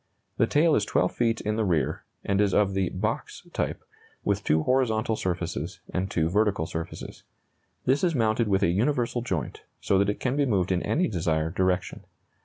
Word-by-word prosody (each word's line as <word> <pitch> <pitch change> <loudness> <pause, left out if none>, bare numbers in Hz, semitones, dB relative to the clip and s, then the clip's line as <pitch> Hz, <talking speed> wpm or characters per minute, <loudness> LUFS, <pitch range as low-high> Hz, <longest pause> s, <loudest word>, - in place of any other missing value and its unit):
The 115 - +3
tail 155 +5 +3
is 105 - +3
12 90 -3 +1
feet 115 -1 0
in 105 +1 -1
the 110 - +1
rear, 85 -9 0 0.2
and 100 0 +2
is 100 -2 +2
of 100 -2 +3
the 95 -2 0
"box" - - -3
type, - - -2 0.4
with - - 0
two 80 +1 +2
horizontal 115 -3 +1
surfaces 90 -3 -3
and 95 +2 -1
two 80 -3 +1
vertical 100 -2 +1
surfaces. 80 0 -6 0.6
This 135 +5 +2
is 170 -3 +2
mounted 110 -1 +2
with 100 -1 +2
a 85 - +4
universal 120 +4 +1
joint, 95 -9 -3 0.2
so 95 - +2
that 100 +1 +2
it 105 - -2
can 130 +1 0
be 145 -1 +2
moved 95 -5 +1
in 90 -1 +1
any 180 +4 +1
desired 80 - -1
direction. 95 -1 0
100 Hz, 190 wpm, -26 LUFS, 90-115 Hz, 0.6 s, a